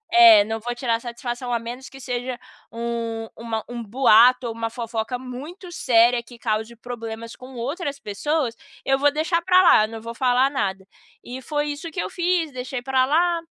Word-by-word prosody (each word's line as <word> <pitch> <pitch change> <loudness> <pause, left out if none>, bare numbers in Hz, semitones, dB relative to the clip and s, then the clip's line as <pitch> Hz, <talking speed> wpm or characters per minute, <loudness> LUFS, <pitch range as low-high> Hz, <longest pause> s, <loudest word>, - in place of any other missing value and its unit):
É, 345 -3 +9
não 225 -3 -4
vou 240 +2 -4
tirar 240 -2 0
satisfação, 240 +1 -5
a 235 - +2
menos 240 +3 -7
que 270 - -13
seja 250 -1 -4 0.3
um 230 -1 -4
uma 225 -1 -4
um 240 -1 -6
boato 245 +2 +5
ou 230 - -4
uma 225 0 -3
fofoca 230 0 -4
muito 290 +9 -9
séria, 240 -4 +3
que 235 0 -15
cause 220 +1 -2
problemas 230 -1 -7
com 255 0 -12
outras 280 +4 -4
pessoas, 265 +3 -2 0.3
eu 270 0 +2
vou 290 +1 +4
deixar 325 +3 0
pra 365 +1 +5
lá, 215 -11 +7
eu - - -7
não 225 0 -8
vou 230 +1 -7
falar 255 +2 +2
nada. 195 -7 -2 0.4
E 255 +2 -7
foi 295 +2 -2
isso 295 +4 -6
que 315 - -6
eu 185 +1 -3
fiz, 345 -3 0
deixei 255 0 -5
pra 260 -1 +2
lá, 340 +3 +2
245 Hz, 190 wpm, -23 LUFS, 230-280 Hz, 0.4 s, É